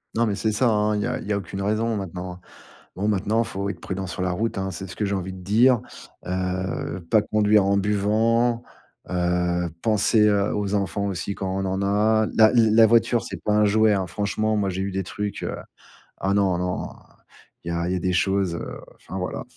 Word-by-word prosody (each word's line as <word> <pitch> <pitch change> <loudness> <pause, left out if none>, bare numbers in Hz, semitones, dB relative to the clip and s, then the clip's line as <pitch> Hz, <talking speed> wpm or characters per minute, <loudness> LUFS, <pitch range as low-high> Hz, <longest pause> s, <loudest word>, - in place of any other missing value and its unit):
Non, 115 0 +2
mais 100 - 0
c'est 110 +2 0
ça, 120 +4 +2
hein, 105 -1 +1
il 105 - -1
y - - -1
a - - -2
il - - -9
y 105 - 0
a 100 - +1
aucune 95 +1 -5
raison 110 +2 0
maintenant. 90 -2 -6 0.6
Bon, 100 +3 -1
maintenant, 105 +2 +1
il - - -2
faut 100 +1 -4
être 100 - -5
prudent 95 0 -4
sur 90 - -4
la 90 0 0
route, 110 +3 -2
hein, 95 0 -2
c'est 95 +1 -6
ce - - -9
que 105 - -1
j'ai 100 0 -1
envie 95 0 -3
de 95 - -9
dire, 115 +6 +4 0.5
heu, 90 -1 -3
pas 110 -2 +5
conduire 105 -1 +3
en 100 +1 +2
buvant, 110 +4 +1 0.4
heu, 90 -1 0
penser, 110 0 +3
heu, 100 -1 +2
aux 100 -1 -1
enfants 100 0 -1
aussi 100 +1 -3
quand 95 - -3
on 95 - -1
en 95 0 -1
a 105 +2 +2
la 110 -1 +6
la 115 -2 +5
voiture, 115 +1 +3
c'est - - -7
pas 105 - 0
un 105 0 +4
jouet, 110 +1 +4
hein, 95 -3 0
franchement, 105 +3 -1
moi, 100 -2 0
j'ai 95 +1 -2
eu 100 - -2
des 95 0 -3
trucs, 105 +2 -4
heu, - - -3 0.7
ah, 95 +1 +1
non, 95 -3 +2
non, 90 0 -2 0.8
il - - -4
y - - -1
a 85 +1 -1
il 90 - 0
y - - 0
a - - -2
des 90 +1 -1
choses, 90 0 +1
heu, - - -6 0.2
enfin, 95 - -9
voilà. 90 -1 -4
100 Hz, 230 wpm, -24 LUFS, 95-110 Hz, 0.8 s, la